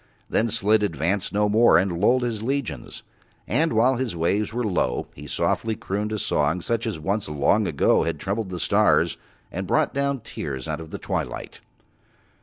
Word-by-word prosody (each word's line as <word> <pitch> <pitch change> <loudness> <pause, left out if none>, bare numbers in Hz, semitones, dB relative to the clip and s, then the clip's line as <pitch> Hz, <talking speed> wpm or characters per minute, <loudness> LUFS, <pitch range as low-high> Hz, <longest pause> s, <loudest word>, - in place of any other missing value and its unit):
Then 115 - +1
Slid 105 +1 +3
advanced 90 +1 -1
no 105 +1 +2
more 110 +3 +5
and 90 -2 0
lulled 125 +4 +4
his 115 -3 -2
legions, 115 - -3 0.4
and 155 +8 +1
while 120 +3 +3
his 125 -6 -2
waves 95 +7 0
were 120 +2 -2
low 90 - 0
he 75 +1 -10
softly 110 +9 0
crooned 105 +2 -3
a 110 - -1
song 75 -3 +1
such 115 +4 -1
as 105 -8 -3
once 100 +4 -2
long 75 +8 +2
ago 75 -5 +3
had 85 -2 -1
troubled 100 +1 -2
the 90 -1 -5
stars - - +3 0.3
and - - -4
brought - - +2
down 140 -2 -1
tears 65 -9 -5
out - - -3
of 80 - -9
the - - -5
twilight. - - -4
105 Hz, 180 wpm, -24 LUFS, 85-115 Hz, 0.4 s, more